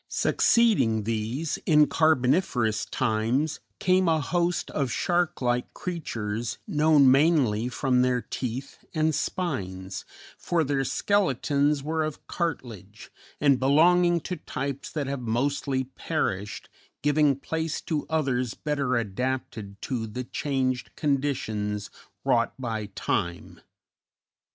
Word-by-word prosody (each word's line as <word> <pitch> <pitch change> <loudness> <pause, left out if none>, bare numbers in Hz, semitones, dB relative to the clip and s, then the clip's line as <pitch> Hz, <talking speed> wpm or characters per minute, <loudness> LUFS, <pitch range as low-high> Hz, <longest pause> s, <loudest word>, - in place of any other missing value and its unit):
Succeeding 195 - +3
these, 115 +8 -2
in 150 -2 +6
Carboniferous 130 - +2
times, 125 +6 0 0.2
came 185 0 +3
a 160 -1 +3
host 175 +4 -1
of 140 -4 -1
shark 175 -2 0
like 120 0 0
creatures 115 -10 -4
known 150 -3 +5
mainly 135 -6 +3
from 125 0 +1
their 125 -1 +2
teeth 125 +2 -5
and 155 0 +2
spines, 95 - -3 0.4
for 170 -2 +1
their 135 -1 0
skeletons 145 - +1
were 160 +1 0
of 155 -1 -5
cartilage, 115 - -5 0.3
and 140 -3 +4
belonging 170 +6 +4
to 180 +3 -4
types 140 0 -5
that 150 -3 -2
have 135 -1 -3
mostly 130 +3 0
perished, 125 - -3 0.4
giving 145 -1 +3
place 160 +3 -3
to 155 -3 -3
others 130 -7 0
better 140 -4 -1
adapted 110 -2 -3
to 120 -4 -2
the 125 +4 -5
changed 130 -1 -2
conditions 110 -8 -1 0.3
wrought 115 -1 +2
by 110 -5 -3
time. 85 -2 -2
135 Hz, 110 wpm, -26 LUFS, 115-155 Hz, 0.4 s, in